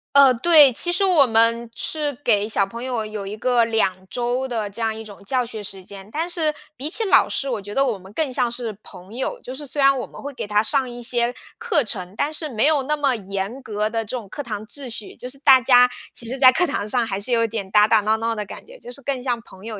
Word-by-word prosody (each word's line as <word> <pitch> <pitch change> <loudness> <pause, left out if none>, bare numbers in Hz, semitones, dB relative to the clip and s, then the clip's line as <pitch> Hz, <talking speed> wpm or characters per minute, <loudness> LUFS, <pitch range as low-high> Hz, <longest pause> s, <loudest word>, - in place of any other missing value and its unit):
呃， 275 -2 +7
对， 290 +1 +6
其 350 +9 +3
实 390 +3 +2
我 340 -7 +5
们 230 0 +2
是 300 +2 -2
给 210 -6 +2
小 200 -2 +2
朋 230 +5 -8
友 245 -4 -2
有 215 -2 -6
一 205 +2 -6
个 245 0 +2
2 195 -5 0
周 245 +2 -1
的 225 -5 -3
这 215 +4 -8
样 220 -1 0
一 220 0 -8
种 200 -2 -13
教 250 +4 0
学 220 -3 -7
时 190 -2 -5
间， 195 +1 -11
但 325 +3 -2
是 330 -4 0 0.2
比 285 +3 -4
起 445 +6 +2
老 - - +4
师， 275 - -2
我 225 -5 -3
觉 205 +1 -8
得 275 +3 +2
我 235 -6 -1
们 190 +1 -15
更 285 +3 -2
像 245 -1 +1
是 235 -4 -5
朋 185 +4 -13
友， 375 - -3
就 255 - -8
是 295 - -7
虽 285 +1 -3
然 275 0 +5
我 250 - -3
们 - - -13
会 285 0 -7
给 250 - -5
他 210 0 +2
上 260 +3 0
一 240 0 -9
些 240 0 +2 0.2
课 435 -11 +1
程， 185 -3 -4
但 295 +2 0
是 310 -1 -3
没 225 -1 +1
有 300 -3 +3
那 300 +3 -1
么 280 -3 +1
严 200 +4 -5
格 215 -2 -2
的 225 0 -2
这 235 +4 -4
种 220 - -9
课 290 +8 -6
堂 215 -2 -6
秩 275 0 -6
序， 225 -3 -7
就 250 - -8
是 275 - -4
大 265 -2 +6
家 250 0 +6 0.2
其 235 - -5
实 260 +3 -4
在 255 -1 +7
课 350 +7 +2
堂 205 - -2
上 230 +2 0
还 195 -3 -2
是 205 +5 -3
有 230 -1 +3
一 - - -1
点 205 -4 -6
打 210 +1 +5
打 220 -1 +4
闹 215 +2 +1
闹 230 0 -2
的 210 -1 -4
感 200 - -10
觉， - - -13
就 245 - -11
是 280 - -6
更 270 -1 -3
像 245 -3 -1
朋 190 -4 -16
友 220 -2 -7
240 Hz, 295 characters per minute, -21 LUFS, 215-275 Hz, 0.2 s, 呃